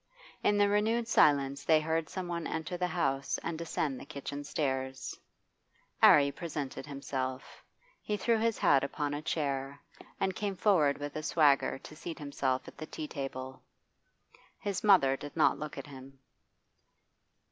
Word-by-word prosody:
In 205 - +3
the 205 0 +5
renewed 220 +3 +1
silence 140 -7 +3
they 160 0 +5
heard 160 +1 -1
some 185 -2 -4
one 170 -1 -3
enter 160 +2 -3
the 180 0 0
house 135 -6 0
and 170 - -2
descend 155 -4 -2
the - - -9
kitchen 145 -1 -6
stairs. 130 -2 -2 0.9
'Arry 140 -1 +7
presented 150 -4 -5
himself. 135 -2 -5 0.4
He 210 - -2
threw 225 +3 +2
his 225 0 +1
hat 140 -1 +4
upon 145 +1 -2
a 145 - -3
chair, 140 -3 -2 0.4
and 190 -1 0
came 200 -2 -2
forward 170 -8 +3
with 145 0 -6
a 155 - -2
swagger 150 -4 +3
to 155 - -12
seat 165 +1 -7
himself 140 -4 -2
at - - -12
the 155 - -6
tea 155 - -6
table. 130 -2 -6 1.0
His 200 -2 -3
mother 180 -11 +5
did 145 +1 -9
not - - +4
look 150 0 -6
at 140 - -6
him. 135 -1 -12
145 Hz, 160 wpm, -31 LUFS, 135-170 Hz, 1.0 s, Arry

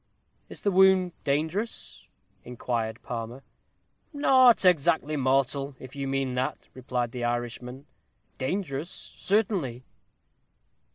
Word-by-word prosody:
"Is - - -9
the 200 - +2
wound 190 -1 +5
dangerous?" 160 +10 -2 0.4
inquired 115 -2 -3
Palmer. 120 +2 -6 0.7
"Not 260 - +5
exactly 160 -3 +3
mortal, 135 0 0
if 130 +1 -11
you 140 -1 -3
mean 135 -1 -1
that," 130 +1 -1 0.2
replied 125 -2 -3
the 125 0 -5
Irishman; 120 +2 -3 0.5
"dangerous, 145 +1 -2
certainly." 190 - -1
135 Hz, 100 wpm, -27 LUFS, 125-180 Hz, 0.7 s, wound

